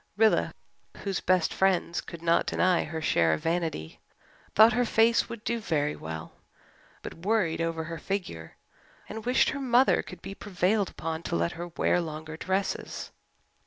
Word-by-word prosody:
Rilla, 220 0 +3 0.5
whose 195 -3 -1
best 185 -3 +2
friends 185 -2 +1
could 170 -1 -10
not 170 0 +3
deny 185 -2 +2
her 160 0 -5
share 80 - +3
of 80 - -3
vanity, 165 - -2 0.6
thought 220 +2 +8
her 245 +2 +2
face 230 0 +3
would 235 -2 -7
do 235 0 -1
very 150 -7 0
well, 80 0 -7 0.7
but - - -6
worried 190 -6 +1
over 165 -1 -1
her 165 0 -6
figure, 155 - -4 0.5
and 220 +2 -7
wished 250 - +4
her 285 - -4
mother 255 0 +4
could - - -12
be 195 - -6
prevailed 195 +1 0
upon 160 0 -4
to - - -3
let 85 0 +1
her 175 +1 -6
wear 175 +1 +1
longer 155 -1 -6
dresses. 190 +4 -3
175 Hz, 160 wpm, -28 LUFS, 160-210 Hz, 0.7 s, thought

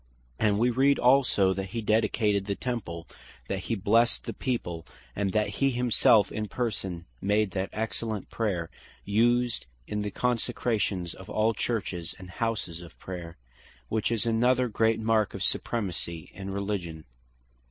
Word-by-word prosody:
And 105 -2 +3
we 120 +3 +3
read 135 +3 +4
also 125 -7 +4
(1 - - -11
Kings - - -1
8.) - - +1
that - - -16
hee 115 - -1
dedicated 105 -2 +2
the 100 - 0
Temple; 95 -10 -4 0.4
that 95 - -1
he 95 +5 -2
blessed 115 +4 +3
the - - -4
People; 90 -10 -2 0.3
and 100 -1 0
that 105 -1 +2
he 135 +7 +1
himselfe 120 -4 +4
in 105 0 -3
person 95 -8 -3 0.2
made 105 0 +2
that 95 +1 -2
excellent 110 -1 -3
prayer, 95 -7 -1 0.3
used 120 - +2 0.2
in 105 +8 -2
the 105 - -2
Consecrations 110 -6 0
of 95 - -12
all 110 +1 +2
Churches, 95 -8 -2
and 90 -1 -10
houses 100 -7 -2
of 85 - -12
Prayer; 85 -2 -7 0.5
which 110 +1 0
is 115 -1 0
another 125 +2 +3
great 110 +1 +2
mark 110 -2 +2
of 95 - -3
Supremacy 85 -9 -2
in 95 +1 -6
Religion. 95 -5 -3
105 Hz, 160 wpm, -28 LUFS, 95-115 Hz, 0.5 s, read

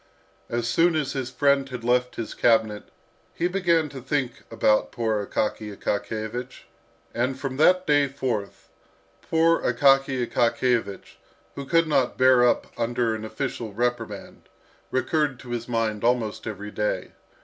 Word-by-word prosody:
As 120 0 -1
soon 165 +8 +3
as 150 -3 -1
his 130 -2 -3
friend 140 0 +2
had 125 -3 -7
left 125 +1 +1
his 115 - -5
cabinet, 110 -3 +2 0.5
he 170 - 0
began 175 -4 +1
to 135 -2 -9
think 135 -2 -2
about 105 0 +2
poor 110 -3 -1
Akaky 105 +1 -2
Akakiyevich. 110 +4 -4 0.5
And 130 +3 -1
from 130 -1 -4
that 180 +4 +4
day 145 -2 +3
forth, 125 -7 -4 0.5
poor 165 +1 +2
Akaky 135 0 +3
Akakiyevich, 115 -4 0 0.4
who 140 -1 -7
could 165 +1 +3
not 140 -5 +1
bear 130 -1 +5
up 125 - +3
under 120 0 0
an 110 0 -5
official 115 -2 -4
reprimand, 120 +3 -4 0.4
recurred 140 +1 0
to 125 - -10
his 120 -1 -3
mind 115 -3 -1
almost 115 -3 0
every 105 -1 -6
day. 105 0 -2
125 Hz, 140 wpm, -25 LUFS, 115-140 Hz, 0.5 s, bear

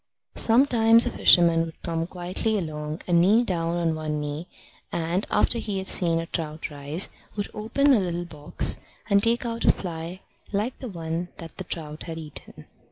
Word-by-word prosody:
Sometimes 230 -1 +5
a 245 - -1
fisherman 170 -2 +5
would 165 -1 -8
come 165 -1 -2
quietly 185 +5 -1
along 155 -3 -4
and 170 -1 +3
kneel 210 +7 +4
down 170 -5 -1
on 165 -2 +1
one 155 -1 -3
knee, 150 +3 -5 0.4
and, 170 +4 -1
after 230 +3 +4
he 205 -3 -3
had 190 - -3
seen 170 -3 +1
a 165 - -2
trout 155 -1 -4
rise, 145 +5 0 0.3
would 205 -1 -4
open 270 +7 +2
a 235 - +4
little 175 -2 -2
box 150 -3 +1 0.3
and 200 0 +5
take 230 +3 +2
out 230 0 -3
a - - +6
fly 170 +1 -6 0.3
like 210 +5 -2
the 255 - -6
one 165 -1 -4
that 165 -2 -10
the - - -2
trout 155 -2 -5
had 165 -1 -6
eaten. 155 -3 -8
175 Hz, 180 wpm, -25 LUFS, 160-210 Hz, 0.4 s, a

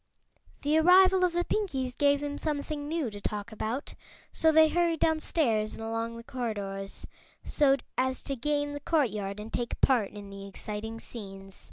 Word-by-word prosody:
The 300 +2 +3
arrival 370 +2 +6
of 360 -1 +3
the 350 0 0
Pinkies 265 - -1
gave 285 0 +3
them 290 0 -3
something 295 -1 -3
new 310 -7 -1
to 205 0 -9
talk 210 +2 -4
about, 225 +5 -4 0.4
so 320 - +3
they 315 0 +7
hurried 340 -1 +1
downstairs 290 -9 +1
and - - -7
along 225 +1 -3
the 230 - -9
corridors 205 -6 -4 0.4
so 275 -2 +3 0.2
as 260 0 0
to 275 - -3
gain 290 +3 -1
the 290 - -4
courtyard 215 - 0
and 215 +2 -8
take 240 -1 -2
part 240 -7 +3
in 205 -1 -10
the 195 0 -8
exciting 215 +3 -6
scenes. 195 -4 -9
260 Hz, 170 wpm, -29 LUFS, 215-305 Hz, 0.4 s, they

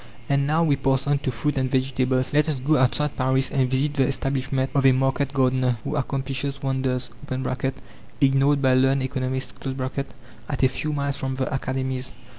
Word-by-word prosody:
And 140 0 +1
now 160 +3 +2
we 145 -4 +2
pass 135 0 +1
on 145 -1 +2
to 130 - -2
fruit 135 +4 -1
and 130 0 0
vegetables. 130 0 0
Let 150 +1 +3
us 145 -4 -1
go 145 +5 +2
outside 145 +2 +1
Paris 130 0 +1
and 130 -2 +1
visit 135 +3 +1
the 135 -3 +2
establishment 135 -1 -1
of 140 - +2
a 135 - +7
market 135 +1 +1
gardener 130 -2 +2
who - - -3
accomplishes 140 0 -2
wonders 130 -2 -1 1.1
(ignored 140 0 +3
by 130 -1 +4
learned 135 +1 +3
economists) 130 -1 -2 1.0
at 140 -2 -2
a - - +7
few 150 +4 -3
miles 140 -1 -1
from 130 -1 -3
the 130 +1 -2
academies. 130 -1 -3
135 Hz, 175 wpm, -24 LUFS, 130-140 Hz, 1.1 s, a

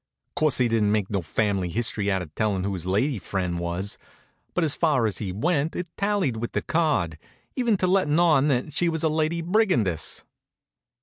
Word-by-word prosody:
Course 145 -2 +2
he 125 - +3
didn't 110 -3 +2
make 105 -2 0
no 100 -2 0
family 95 +1 -1
hist'ry 105 0 0
out 95 -2 0
of 75 -3 -12
tellin' 100 -1 0
who 100 0 -1
his 90 -1 -5
lady 110 +6 +1
fren' 90 -2 -2
was, 85 +3 -2 0.6
but 175 - +2
as 155 -3 +2
far 145 -8 +2
as 105 - -1
he 100 -4 -3
went 150 - 0
it 180 - -3
tallied 200 - 0
with 120 +1 -4
the - - -1
card, 145 - 0 0.4
even 240 -5 +2
to 185 - 0
lettin' 180 -5 +2
on 155 -5 +4
that 135 +1 0
she 170 +3 +2
was 160 -1 -2
a 160 - +3
Lady 160 +2 0
Brigandess. 165 - +1
120 Hz, 195 wpm, -25 LUFS, 95-160 Hz, 0.6 s, on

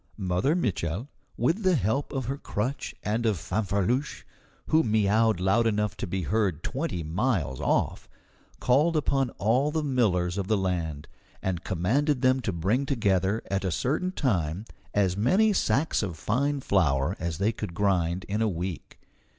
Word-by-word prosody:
Mother 95 - +1
Mitchel, 105 - -2 0.3
with 175 +7 +1
the 185 -3 +3
help 130 - 0
of 135 -3 -3
her 135 +3 -3
crutch 130 +4 -3
and 110 +3 -1
of 105 -4 +1
Fanfreluche, 100 - -1 0.4
who 160 +1 +4
miaowed 110 -1 +2
loud 110 +5 +3
enough 105 -1 0
to - - -4
be 95 +1 -2
heard 95 -4 0
twenty 135 - -3
miles 80 - -1
off, - - 0 0.5
called 150 +6 +3
upon 135 -3 +1
all 125 +8 +2
the 155 0 -1
millers 100 -10 +1
of 95 - -3
the 110 - +2
land, 85 -6 -2 0.4
and 95 -2 -2
commanded 130 - 0
them 130 +1 +4
to 115 - -2
bring 100 +11 0
together 100 -4 +1
at 100 0 0
a 95 - 0
certain 150 - -1
time 95 - -1 0.3
as 95 -3 +2
many 190 - +3
sacks 140 - +1
of 90 -6 -4
fine 140 - 0
flour 85 - +1
as 85 -3 -3
they 100 +4 +1
could 105 -6 -6
grind 90 -3 +1
in 105 +2 -2
a 110 - +2
week. 90 -2 -5
105 Hz, 160 wpm, -27 LUFS, 90-130 Hz, 0.5 s, who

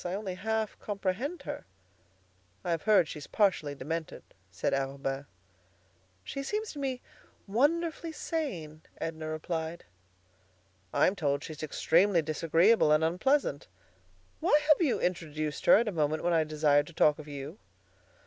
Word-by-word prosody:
I 180 +1 -2
only 200 -2 -4
half 220 +3 -2
comprehend 205 - -3
her." - - -6 1.0
"I've 170 -2 -1
heard 200 -6 +4
she's 150 -2 -8
partially 180 -9 +1
demented," 160 +4 -5 0.3
said 90 - -2
Arobin. 135 0 -2 1.0
"She 275 - -5
seems 425 +10 -3
to 295 - -8
me 265 -2 -2 0.4
wonderfully 320 +9 +1
sane," 185 - -4 0.2
Edna 160 -1 -4
replied. 160 +1 -4 1.1
"I'm 190 - +3
told 145 -5 0
she's 155 -1 -8
extremely 170 +3 +3
disagreeable 165 +4 +3
and 155 +1 +4
unpleasant. 180 - +1 0.7
Why 295 - +4
have 305 - +6
you 295 -7 +2
introduced 155 -4 -2
her - - +9
at 230 +2 +1
a - - 0
moment 155 -2 0
when 175 0 +2
I 160 -1 +3
desired 150 -1 +2
to 170 - -12
talk 150 0 +3
of 155 - -9
you?" 145 +6 -7
170 Hz, 140 wpm, -30 LUFS, 155-215 Hz, 1.1 s, her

